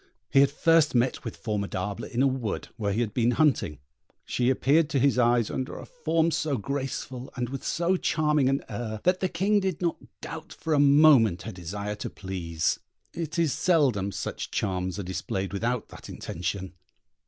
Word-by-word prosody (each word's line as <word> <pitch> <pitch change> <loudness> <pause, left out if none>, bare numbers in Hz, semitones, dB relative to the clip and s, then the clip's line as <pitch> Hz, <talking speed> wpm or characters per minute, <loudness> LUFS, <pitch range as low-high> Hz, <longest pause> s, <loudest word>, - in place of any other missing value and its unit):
He 135 - +5
had 140 0 +6
first 160 0 +3
met 125 +2 +1
with - - -6
Formidable 100 -2 -3
in 125 +1 0
a - - +5
wood 130 -5 -3
where 100 -2 -1
he 110 +4 0
had 110 -3 -2
been 120 -1 +2
hunting; 125 - +2 0.5
she 125 0 +1
appeared 145 +4 +3
to 145 - 0
his 135 -1 +3
eyes 120 -2 +3
under 130 - -4
a - - -8
form 165 - 0
so 150 -4 0
graceful, 130 +1 -4
and 125 -2 -2
with 135 0 -6
so 175 +2 +1
charming 150 -5 +2
an 135 +1 0
air, 110 -3 -5
that 180 +1 +3
the 185 - 0
King 200 +5 +2
did 190 -4 -2
not 170 -2 0 0.2
doubt 160 0 -8
for 160 - -2
a 145 - +3
moment 140 - +6
her 115 - -5
desire 100 +3 -5
to - - -4
please: 85 -4 -2 0.3
it 160 -2 -4
is 165 -4 +2
seldom 130 - +2
such - - -4
charms 95 -2 -2
are 100 - -3
displayed 95 +2 -3
without 115 +4 -1
that - - -11
intention. 90 +2 -4
130 Hz, 185 wpm, -27 LUFS, 100-155 Hz, 0.5 s, had